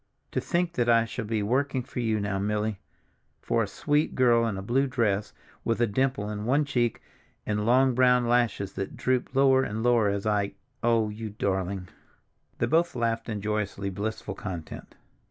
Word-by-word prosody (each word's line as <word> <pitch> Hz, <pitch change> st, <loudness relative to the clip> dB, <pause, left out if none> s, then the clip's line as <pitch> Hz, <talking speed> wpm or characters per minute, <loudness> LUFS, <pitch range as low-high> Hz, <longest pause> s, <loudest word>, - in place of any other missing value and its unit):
To -, -, -1 dB
think 175 Hz, -1 st, 0 dB
that 120 Hz, -5 st, +1 dB
I 115 Hz, -1 st, +5 dB
shall 115 Hz, 0 st, -5 dB
be 110 Hz, -1 st, -1 dB
working 130 Hz, +4 st, 0 dB
for 130 Hz, 0 st, -7 dB
you 110 Hz, -2 st, +1 dB
now, 100 Hz, -1 st, -1 dB
Milly—for 105 Hz, +2 st, -4 dB
a 110 Hz, -, 0 dB
sweet 145 Hz, +9 st, 0 dB
girl 120 Hz, -2 st, +4 dB
in 105 Hz, -4 st, -2 dB
a 95 Hz, -, -5 dB
blue 130 Hz, +6 st, +1 dB
dress, 110 Hz, -6 st, 0 dB, 0.3 s
with 115 Hz, -, 0 dB
a 120 Hz, -, +4 dB
dimple 120 Hz, 0 st, 0 dB
in 105 Hz, 0 st, -4 dB
one 140 Hz, +5 st, +2 dB
cheek 120 Hz, -5 st, 0 dB, 0.4 s
and 105 Hz, 0 st, -1 dB
long 130 Hz, +2 st, +4 dB
brown 125 Hz, -1 st, +4 dB
lashes 120 Hz, -5 st, +1 dB
that 95 Hz, 0 st, -5 dB
droop 130 Hz, 0 st, -1 dB
lower 135 Hz, -1 st, +5 dB
and 110 Hz, -3 st, -3 dB
lower 120 Hz, -4 st, +4 dB
as 100 Hz, 0 st, -2 dB
I—oh, 110 Hz, +2 st, 0 dB
you 110 Hz, +1 st, -6 dB
darling!" 95 Hz, -2 st, -2 dB, 0.7 s
They -, -, +1 dB
both 165 Hz, -1 st, +2 dB
laughed 115 Hz, -1 st, -1 dB
in 105 Hz, -2 st, -3 dB
joyously 100 Hz, -2 st, -2 dB
blissful 105 Hz, +1 st, -4 dB
content. 90 Hz, -5 st, -7 dB
115 Hz, 175 wpm, -27 LUFS, 105-125 Hz, 0.7 s, I